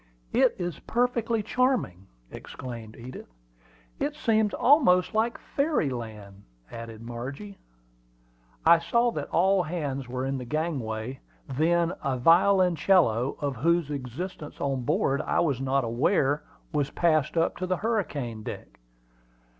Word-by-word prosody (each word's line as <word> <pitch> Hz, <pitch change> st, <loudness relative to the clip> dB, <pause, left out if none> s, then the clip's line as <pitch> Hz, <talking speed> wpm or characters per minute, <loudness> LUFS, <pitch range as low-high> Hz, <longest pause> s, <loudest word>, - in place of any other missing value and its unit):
"It -, -, +4 dB
is 175 Hz, -3 st, -4 dB
perfectly 235 Hz, -2 st, 0 dB
charming!" 230 Hz, -, 0 dB, 0.2 s
exclaimed 115 Hz, -4 st, -8 dB
Edith. 125 Hz, -, -10 dB, 0.7 s
"It 295 Hz, +1 st, -1 dB
seems 220 Hz, -7 st, +2 dB
almost 235 Hz, -, +4 dB
like 225 Hz, +2 st, +1 dB
fairy 280 Hz, -, 0 dB
land!" 105 Hz, -5 st, -7 dB, 0.3 s
added 115 Hz, -1 st, -8 dB
Margie. 135 Hz, -, -7 dB, 1.1 s
I 165 Hz, +1 st, +7 dB
saw 235 Hz, +8 st, +2 dB
that -, -, -5 dB
all 190 Hz, +2 st, +3 dB
hands 145 Hz, -6 st, -4 dB
were 130 Hz, +1 st, -3 dB
in 135 Hz, 0 st, -2 dB
the -, -, -5 dB
gangway; 130 Hz, -5 st, -3 dB, 0.3 s
then 165 Hz, +5 st, +1 dB
a 135 Hz, -2 st, 0 dB
violoncello, 170 Hz, -, +4 dB
of 140 Hz, -3 st, -2 dB
whose 165 Hz, +3 st, +1 dB
existence 145 Hz, +4 st, -6 dB
on 135 Hz, -2 st, -1 dB
board 135 Hz, +3 st, +1 dB
I -, -, 0 dB
was 140 Hz, -6 st, +1 dB
not 135 Hz, 0 st, +1 dB
aware, 135 Hz, -, +1 dB, 0.3 s
was 145 Hz, -2 st, 0 dB
passed 155 Hz, -2 st, +1 dB
up 165 Hz, -, +2 dB
to 185 Hz, -, -3 dB
the 185 Hz, 0 st, 0 dB
hurricane 150 Hz, -, -2 dB
deck. -, -, -8 dB
150 Hz, 130 wpm, -27 LUFS, 125-185 Hz, 1.1 s, I